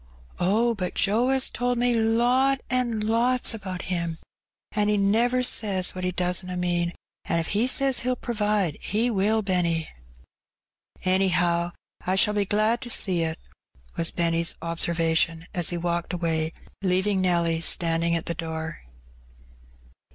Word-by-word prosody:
''Oh> 225 +6 +2
but 185 -3 -4
Joe 220 +6 +2
*as 265 0 +2
told 245 0 -1
me 245 0 +2
lot 245 +4 +2
an* 240 -4 0
lots 235 +4 +1
about 190 -4 -6
Him; 170 -2 -2 0.5
an' 210 -1 0
He 210 0 +2
never 235 +6 +2
says 195 -6 +1
what 185 - -6
He 180 - 0
doesna 180 0 0
mean; 175 -1 0 0.3
an* 170 - 0
if 165 - -1
He 215 +5 +1
says 270 0 +3
He'll 255 +1 -1
provide. 210 -9 -1
He 230 +4 0
will, 215 +2 +1
Benny." 170 -4 0 1.2
''Anyhow, 175 -2 +2 0.3
I 185 - 0
shall 210 +2 +3
be 205 -1 0
glad 215 +4 +1
to 245 - -6
see 185 -6 +2
it," 160 0 -2 0.6
was 165 - +2
Benny's 170 -1 +1
obser 170 +1 -2
vation, 165 0 +1
as 175 -4 +2
he 175 - -2
walked 170 +1 -2
away, 165 -2 -1 0.3
leaving 190 +1 +1
Nelly 170 -3 +1
standing 170 0 +2
at 165 - -2
the 170 - -2
door. 160 -1 -5
185 Hz, 150 wpm, -25 LUFS, 170-225 Hz, 1.2 s, says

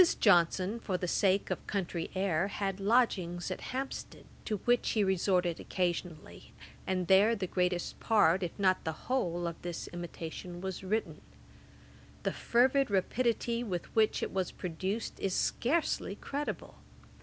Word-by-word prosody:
Johnson, 185 +2 +4
for 190 -5 -2
the 180 0 -3
sake 195 +2 +2
of - - -4
country 175 -4 -2
air, 185 -2 +1
had 195 -1 -3
lodgings 195 -5 +1
at - - -4
Hampstead, 265 +1 -5 0.2
to 215 - -1
which 245 0 +3
he 215 - +3
resorted 185 -2 +1
occasionally, 175 - -3 0.3
and 185 -1 0
there 200 +6 +5
the 200 -3 -2
greatest 180 -1 -1
part, 195 -5 +4
if 175 -3 -4
not 185 -2 +2
the 160 - -2
whole, 175 -10 0
of 170 -1 -5
this 175 -1 -5
Imitation 175 0 -7
was 190 0 -5
written. 215 +4 -2 1.0
The - - 0
fervid 260 +3 +3
rapidity 235 +4 0
with 180 -7 -5
which 220 -1 +3
it - - -3
was 190 -2 0
produced, 190 +5 -4
is 190 -2 -1
scarcely 280 - 0
credible. 285 +6 -5
190 Hz, 145 wpm, -31 LUFS, 175-220 Hz, 1.0 s, there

